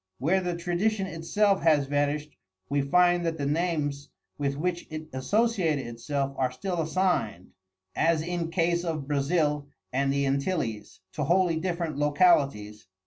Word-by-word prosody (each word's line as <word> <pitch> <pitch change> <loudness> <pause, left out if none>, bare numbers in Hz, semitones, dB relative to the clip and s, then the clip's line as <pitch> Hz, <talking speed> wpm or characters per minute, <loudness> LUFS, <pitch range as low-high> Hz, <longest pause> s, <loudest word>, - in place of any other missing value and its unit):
Where 175 +9 +1
the 175 -1 -2
tradition 190 +4 0
itself 190 +4 +1
has 155 -4 +4
vanished 145 +1 -1 0.3
we 140 0 +1
find 175 +5 +3
that 165 -1 -1
the 140 - -2
names 145 -2 -1 0.3
with 140 -1 -2
which 175 +2 -2
it 155 0 -6
associated 180 - +1
itself 135 +4 -3
are 130 -1 +1
still 175 +5 -3
assigned, 160 - -1 0.4
as 160 -1 +2
in 170 -1 -3
case 170 0 +1
of 155 -5 -3
Brazil 150 0 0 0.3
and 135 +1 +1
the 140 0 +1
Antilles, 135 - -2
to 150 - -2
wholly 175 0 +2
different 170 -4 -2
localities. 140 - +2
155 Hz, 140 wpm, -27 LUFS, 140-175 Hz, 0.4 s, has